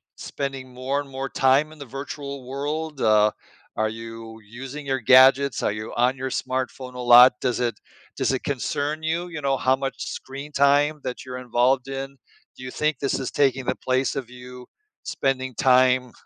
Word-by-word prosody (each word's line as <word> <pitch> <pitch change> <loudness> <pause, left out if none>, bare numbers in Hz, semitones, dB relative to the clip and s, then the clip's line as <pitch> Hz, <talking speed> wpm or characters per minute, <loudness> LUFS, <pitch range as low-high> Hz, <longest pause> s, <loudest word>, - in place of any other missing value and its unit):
spending 135 -2 -6
more 130 +3 -2
and 140 - -12
more 135 0 -5
time 135 +4 +2
in 155 - -15
the 140 - -7
virtual 140 -1 -7
world? 150 +2 -4
Uh, 105 -1 +4 0.5
are 110 0 +1
you 115 0 -9 0.3
using 145 +2 -8
your 135 -1 -1
gadgets? 130 +3 +5
Are - - +1
you 105 +2 -6
on 125 +2 +2
your 130 0 -3
smartphone 130 -1 -4
a - - -7
lot? 125 +2 +10
Does 125 -2 0
it 120 -2 -1 0.4
does - - +1
it 130 - -3
concern 145 +3 -2
you, 165 +3 -1
you 160 -3 -6
know, 135 -1 +1
how 130 +1 +2
much 135 0 -3
screen 140 +2 -7
time 145 +2 +3
that 125 - -4
you're 125 -1 -6
involved 125 +2 +2
in? 135 0 -4 0.5
Do - - -12
you 125 - -6
think 150 +1 -1
this 140 -1 -1
is 135 - -3
taking 135 -2 +1
the 130 - 0
place 130 0 +1
of 130 -3 -5
you 125 0 -11 0.4
spending 130 -1 -2
time 130 0 +3
130 Hz, 185 wpm, -24 LUFS, 125-140 Hz, 0.5 s, lot